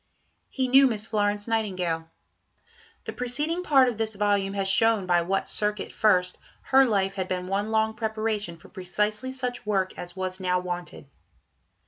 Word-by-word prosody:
He 260 -1 -1
knew 270 +2 +6
Miss 215 -4 -1
Florence 205 -1 -1
Nightingale. 185 -8 -1 1.0
The - - -5
preceding 295 +8 -1
Part 275 -7 +4
of 235 -3 -3
this 220 -1 -1
volume 200 -1 0
has 195 -1 0
shown 220 0 +3
by 175 -1 +3
"what 190 +3 -1
circuit 210 -1 -1
first" 180 -4 +2 0.2
her 270 0 +5
life 195 -5 +1
had 190 -2 -3
been 180 -1 -3
one 200 +3 -1
long 220 0 +1
preparation 215 -4 -2
for 165 - -16
precisely 210 +5 -2
such 250 -2 -4
work 195 -3 -1
as 175 0 -8
was 185 0 -4
now 180 -1 +1
wanted. 180 -3 -6
210 Hz, 160 wpm, -26 LUFS, 185-225 Hz, 1.0 s, knew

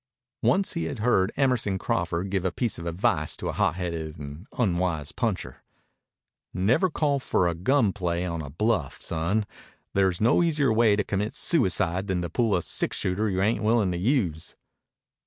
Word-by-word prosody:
Once 195 +1 +2
he 170 - -2
had - - -4
heard 110 -3 +2
Emerson 125 -8 +1
Crawford 85 +1 -2
give 95 -2 0
a 95 - 0
piece 115 +2 -2
of 85 - -6
advice 85 +3 0
to - - -4
a - - -3
hotheaded 85 -2 -2
and 75 +6 -9
unwise 85 - 0
puncher. - - -3 0.9
"Never 115 - +2
call 145 -3 0
for 90 -8 +1
a 85 - 0
gun 105 - +2
play 90 -2 -2
on 85 -2 -3
a 75 - -7
bluff, 100 - -1
son. 85 +7 -1 0.5
There's 95 -2 +2
no 115 +9 +4
easier 150 -8 +2
way 110 -2 +4
to 105 - 0
commit 105 +2 -2
suicide 95 - +1
than 90 -2 -1
to 85 - -5
pull 115 +1 +1
a 85 - 0
six - - -1
shooter 100 +4 0
you 95 0 0
ain't 110 +3 +1
willin' 110 -3 +2
to 90 - -2
use." 90 - 0
95 Hz, 175 wpm, -26 LUFS, 85-115 Hz, 0.9 s, no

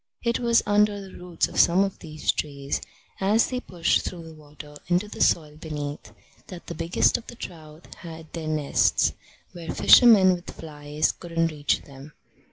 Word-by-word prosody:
It 235 -1 0
was 235 -1 +2
under 205 0 +2
the 195 -1 -11
roots 175 -2 -2
of - - -4
some 180 +3 +5
of 195 -1 -4
these 155 -2 -2
trees, 140 -1 -4 0.4
as 210 +6 +2
they 250 - -2
pushed 175 -8 0
through 175 -2 -7
the 165 0 -11
water 150 -1 -14
into 180 +4 +1
the - - -8
soil 150 -2 +1
beneath, 150 -2 -6 0.4
that 180 -2 -10
the - - -6
biggest 165 +2 +1
of 230 - -17
the - - -10
trout 160 -5 -11
had 160 -2 -11
their 165 -2 -5
nests, 155 -2 +1 0.4
where 170 -2 -7
fishermen 210 -7 +7
with 175 -1 -7
flies 150 -1 -3
couldn't 165 -1 -2
reach 145 -2 -1
them. 140 +1 -13
165 Hz, 175 wpm, -25 LUFS, 150-190 Hz, 0.4 s, fishermen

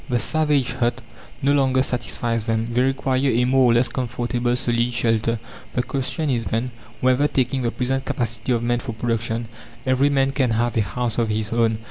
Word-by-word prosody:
The 125 - +2
savage's 145 -1 +1
hut 120 +1 +1 0.4
no 140 +1 +4
longer 130 -2 +3
satisfies 120 -3 -1
them; 115 0 -1
they 125 - +3
require 135 0 +1
a 125 -3 +2
more 130 0 +4
or - - +3
less 120 +1 +4
comfortable 120 0 -1
solid 120 -1 0
shelter. 115 -1 +1 0.4
The 125 - +1
question 140 +4 -2
is, 115 -3 -1
then: 115 +3 -1 0.3
whether, 130 +3 +3
taking 130 -1 0
the 120 - 0
present 130 +2 -2
capacity 115 0 -2
of 120 -1 0
men 120 0 +1
for 120 -2 -5
production, 115 0 -2 0.4
every 130 +2 +3
man 135 -1 +2
can 130 -3 +1
have 120 +1 0
a 115 - +3
house 115 +5 -2
of 115 -2 +1
his 105 0 -2
own? 115 -1 +2
120 Hz, 190 wpm, -22 LUFS, 115-130 Hz, 0.4 s, no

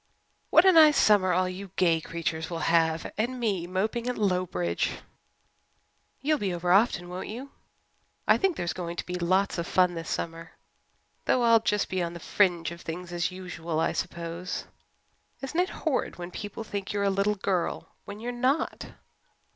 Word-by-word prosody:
What 330 - +6
a 380 - +8
nice 310 -4 +7
summer 200 -3 +5
all 185 +1 +2
you 190 +2 -6
gay 165 -3 +3
creatures 165 -1 -3
will 165 -2 -3
have! 160 -1 +2
And 250 +3 -1
me 195 -7 -1
moping 215 +6 -1
at 250 - -3
Lowbridge!" 180 - 0 1.3
"You'll 300 +2 +1
be 190 -3 -1
over 175 +1 -1
often, 195 -3 +3
won't 180 +1 -6
you? 255 +6 -7 0.8
I - - +5
think 385 -5 +1
there's 175 - -2
going 170 -2 -5
to - - -4
be 180 - -6
lots 185 +2 +1
of 170 - -3
fun 180 -1 +3
this 165 -1 -6
summer, 165 0 -4 0.7
though 250 - +2
I'll 230 -1 +6
just 210 -2 0
be 185 -1 -2
on 170 0 -2
the 170 - -8
fringe 175 -2 +1
of 170 0 -9
things 175 +2 -6
as 175 +1 0
usual, 175 -3 -4
I - - +2
suppose. 170 +1 -4 0.7
Isn't 270 +5 -3
it 365 - +2
horrid 310 -6 -2
when 175 0 -7
people 205 +4 -6
think 200 -2 -5
you're 200 -1 0
a 200 - +2
little 200 +2 +1
girl 185 -3 -2 0.2
when 205 +1 -8
you're 240 +2 -4
not?" 260 +6 0
185 Hz, 180 wpm, -27 LUFS, 170-220 Hz, 1.3 s, a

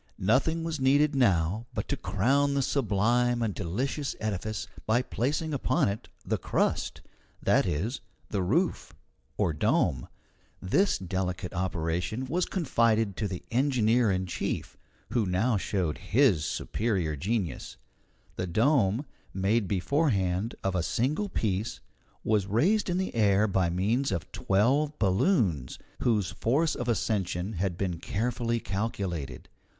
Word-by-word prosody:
Nothing 135 - +2
was 165 -2 -3
needed 140 +3 +4
now 105 -3 +2
but - - -2
to - - +1
crown 140 +6 +1
the 140 - +2
sublime 120 0 +1
and 105 -3 -1
delicious 130 - -2
edifice 110 0 -3 0.2
by 120 +3 +3
placing 150 +6 -1
upon 130 -5 +1
it 100 +2 -5 0.2
the - - -1
crust - - -1 0.4
that - - +2
is, 105 - -2 0.3
the 100 - -1
roof, 155 - 0 0.4
or 80 - +1
dome. 65 -4 +1 0.5
This 190 - +2
delicate 90 -1 -3
operation 90 +5 -2
was 170 +7 0
confided 115 - +1
to 105 - -1
the 90 -2 -6
engineer 120 -3 +3
in 95 -1 0
chief 90 - -3 0.4
who 115 -5 +1
now 105 +7 +1
showed 95 -5 -1
his 105 - +3
superior 95 -9 -1
genius. 90 - -3 0.6
The 90 - -2
dome, 115 - +2 0.3
made 100 +2 +1
beforehand 100 - 0
of 95 - 0
a 90 - +1
single 145 - 0
piece, 110 - -2 0.4
was 105 -3 +1
raised 180 - +2
in 175 - 0
the 190 0 -2
air 105 -2 +3
by 95 -3 +1
means 105 +10 0
of 85 -5 -3
twelve 135 +10 +1
balloons, 95 - +1 0.2
whose 105 -6 +1
force 150 +8 +1
of 120 0 -3
ascension 100 -3 -1
had 90 -1 -2
been 90 -4 -2
carefully 115 +4 -1
calculated. 95 - -3
110 Hz, 135 wpm, -28 LUFS, 95-130 Hz, 0.6 s, needed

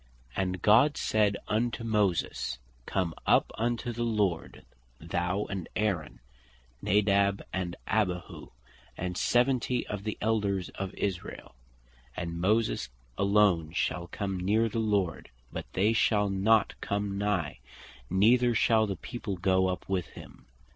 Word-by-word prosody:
"And 95 -1 -2
God 125 +8 +5
said 105 -2 +2
unto 115 +1 -1
Moses, 100 - 0 0.3
Come 90 -4 -1
up - - +4
unto 120 +1 -2
the 120 - -5
Lord, 105 -8 -1 0.3
thou, 90 +5 -2
and 95 -4 -5
Aaron, 95 - -1 0.6
Nadab 100 0 +2
and 90 -2 -2
Abihu, 90 -5 -2 0.5
and 90 0 -3
seventy 125 +3 +1
of 100 -1 -5
the 110 0 -3
Elders 100 -4 0
of 95 -1 -5
Israel. 95 -3 -4 0.6
And 85 0 -4
Moses 105 - +1 0.3
alone 100 -6 +3
shall 90 -1 -1
come 95 0 -3
neer 105 +5 +2
the 115 - -2
Lord, 100 -6 0 0.2
but - - -6
they 105 +4 +3
shall 105 -3 +2
not 100 +3 +3
come 100 -1 -2
nigh, 95 -10 -1 0.5
neither 120 +5 +4
shall 110 0 +3
the 100 - -2
people 105 +1 -5
goe 95 +1 +2
up 90 -1 -3
with 95 -2 -1
him." - - -13
100 Hz, 130 wpm, -29 LUFS, 90-110 Hz, 0.6 s, God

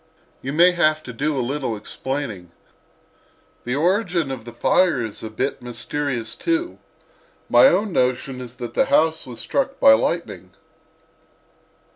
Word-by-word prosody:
You 135 - -4
may 170 +5 +5
have 155 -3 +1
to 125 - -8
do 145 +4 -1
a 125 - 0
little 130 -4 -3
explaining. 110 -5 -5 1.2
The 125 +2 -1
origin 175 -2 +1
of 120 -4 -6
the 120 - -8
fire 160 +5 +2
is 110 - -7
a 110 - -6
bit 130 +6 -3
mysterious, 125 -1 -3
too. 340 +1 -2 0.7
My - - +7
own 210 - +1
notion 130 0 0
is 125 -1 -9
that 120 -2 -7
the - - +3
house 160 0 +2
was 120 -2 -9
struck 275 - -2
by 275 - +8
lightning." - - -2
135 Hz, 145 wpm, -22 LUFS, 120-170 Hz, 1.2 s, by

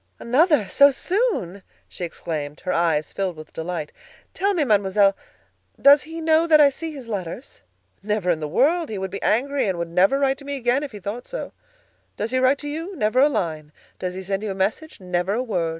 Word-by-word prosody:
"Another! 285 - +3
so 280 +9 +6
soon!" 285 - -1 0.3
she - - -8
exclaimed, 150 -3 -5
her 185 - -2
eyes 165 -3 0
filled 190 -3 -2
with 155 0 -12
delight. 160 -2 -4 0.4
"Tell 400 +1 0
me, 320 - +2
Mademoiselle, 200 -4 +3 0.6
does 280 +1 +7
he 325 +2 -8
know 320 +1 +3
that 310 -2 +6
I 285 -1 +6
see 325 +4 -6
his 270 -6 -9
letters?" 200 +2 -6 0.4
"Never 210 -3 0
in 165 - -1
the 155 - -3
world! 310 - +2
He 215 - -4
would 190 -1 -4
be 200 - -6
angry 275 +3 +1
and 185 -2 -1
would 170 0 -3
never 190 +10 +3
write 270 -1 +1
to 280 - -12
me 285 0 -3
again 245 +2 +1
if 290 -2 -5
he 210 - -9
thought 205 +6 -6
so. - - -6 0.6
Does 215 +3 -3
he 255 - +1
write 260 +2 +3
to - - -3
you? 325 +6 -5
Never 220 -2 +1
a 285 +3 +6
line. 155 - -3 0.3
Does 180 0 -4
he 190 - -6
send 195 +1 -2
you 215 - -4
a 195 - -3
message? 215 +12 -2
Never 180 +1 -1
a 245 - -1
word. 180 -9 -1
215 Hz, 215 wpm, -23 LUFS, 180-285 Hz, 0.6 s, does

